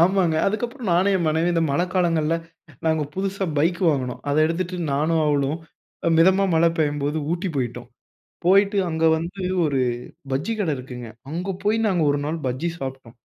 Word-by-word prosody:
ஆமாங்க. 180 Hz, -3 st, +3 dB
அதுக்கப்புறம் 235 Hz, +2 st, -2 dB
நானும் 190 Hz, +3 st, +3 dB
என் 175 Hz, -, -1 dB
மனைவியும் 160 Hz, +3 st, +1 dB
இந்த 165 Hz, -, +2 dB
மழைக்காலங்கள்ல 165 Hz, -1 st, +1 dB, 0.5 s
நாங்க 160 Hz, -1 st, +2 dB
புதுசா 195 Hz, 0 st, -2 dB
பைக் 170 Hz, +4 st, +1 dB
வாங்கினோம். 130 Hz, -5 st, -1 dB
அதை 145 Hz, +1 st, +1 dB
எடுத்துட்டு 180 Hz, +2 st, -2 dB, 0.2 s
நானும், 155 Hz, +3 st, +1 dB
அவளும் 145 Hz, 0 st, +1 dB, 0.5 s
அ -, -, +5 dB
மிதமா 190 Hz, +3 st, +5 dB
மழை 165 Hz, +1 st, +5 dB
பெய்யும்போது, 145 Hz, 0 st, 0 dB
ஊட்டி 180 Hz, +2 st, -2 dB
போயிட்டோம். 120 Hz, -1 st, -3 dB, 0.6 s
போயிட்டு 200 Hz, +2 st, +4 dB
அங்க 160 Hz, 0 st, 0 dB
வந்து 170 Hz, +4 st, -5 dB, 0.2 s
ஒரு 140 Hz, -3 st, 0 dB, 0.5 s
பஜ்ஜி 150 Hz, +12 st, -1 dB
கடை 170 Hz, -7 st, 0 dB
இருக்குங்க. 125 Hz, -2 st, -8 dB, 0.2 s
அங்கே 180 Hz, +5 st, -3 dB
போய் 215 Hz, +2 st, +2 dB
நாங்க 180 Hz, -5 st, +2 dB
ஒரு 145 Hz, -, +1 dB
நாள் 160 Hz, +2 st, -2 dB
பஜ்ஜி 130 Hz, +7 st, -1 dB
சாப்பிட்டோம். 130 Hz, -4 st, -7 dB
165 Hz, 160 wpm, -23 LUFS, 145-185 Hz, 0.6 s, அ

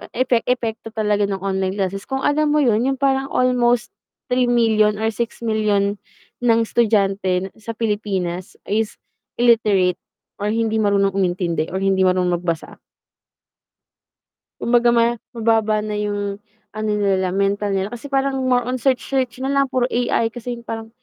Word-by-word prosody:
epe 255 Hz, -1 st, +2 dB
epekto 230 Hz, -3 st, -1 dB
talaga 210 Hz, -1 st, +1 dB
ng 195 Hz, -1 st, -4 dB
online 190 Hz, -1 st, -1 dB
classes, 195 Hz, 0 st, -3 dB
kung 265 Hz, 0 st, -3 dB
alam 305 Hz, +1 st, +2 dB
mo 300 Hz, -, +3 dB
yun 235 Hz, -1 st, +2 dB
yung 270 Hz, -1 st, -1 dB
parang 270 Hz, -1 st, +1 dB
almost 245 Hz, -2 st, +1 dB, 0.4 s
3,000,000 230 Hz, -4 st, +3 dB
million 220 Hz, -, -5 dB
or 225 Hz, -, +2 dB
6,000,000 215 Hz, -3 st, -1 dB, 0.4 s
million 245 Hz, -, -5 dB
ng 230 Hz, -1 st, +4 dB
estudyante 195 Hz, -5 st, +1 dB
sa 230 Hz, +1 st, -6 dB
Pilipinas 195 Hz, -5 st, -2 dB, 0.2 s
is 215 Hz, +1 st, 0 dB, 0.5 s
illiterate 210 Hz, -6 st, +3 dB, 0.4 s
or 210 Hz, +1 st, -1 dB
hindi 225 Hz, -1 st, 0 dB
marunong 200 Hz, -2 st, +2 dB
umintindi 175 Hz, -3 st, 0 dB
or 190 Hz, -, -2 dB
hindi 190 Hz, -1 st, +2 dB
marunong 180 Hz, -1 st, +2 dB
magbasa. 170 Hz, -2 st, -4 dB, 1.8 s
Kumbaga 240 Hz, 0 st, +3 dB
ma 235 Hz, 0 st, +3 dB, 0.2 s
mababa 220 Hz, -1 st, +2 dB
na 210 Hz, -, -3 dB
yung 205 Hz, -1 st, -3 dB, 0.3 s
ano 215 Hz, 0 st, -3 dB
nila 195 Hz, -3 st, +1 dB
mental 200 Hz, +2 st, 0 dB
nila 195 Hz, +5 st, -3 dB
kasi 255 Hz, +4 st, -8 dB
parang 270 Hz, -1 st, 0 dB
more 245 Hz, -1 st, +2 dB
on 250 Hz, -1 st, -3 dB
search-search 260 Hz, -1 st, 0 dB
na 275 Hz, -, 0 dB
lang 275 Hz, -1 st, +2 dB
puro 255 Hz, -2 st, +1 dB
AI 235 Hz, -2 st, 0 dB
kasi 245 Hz, 0 st, -5 dB
parang 225 Hz, 0 st, -6 dB
220 Hz, 150 wpm, -20 LUFS, 200-240 Hz, 1.8 s, ng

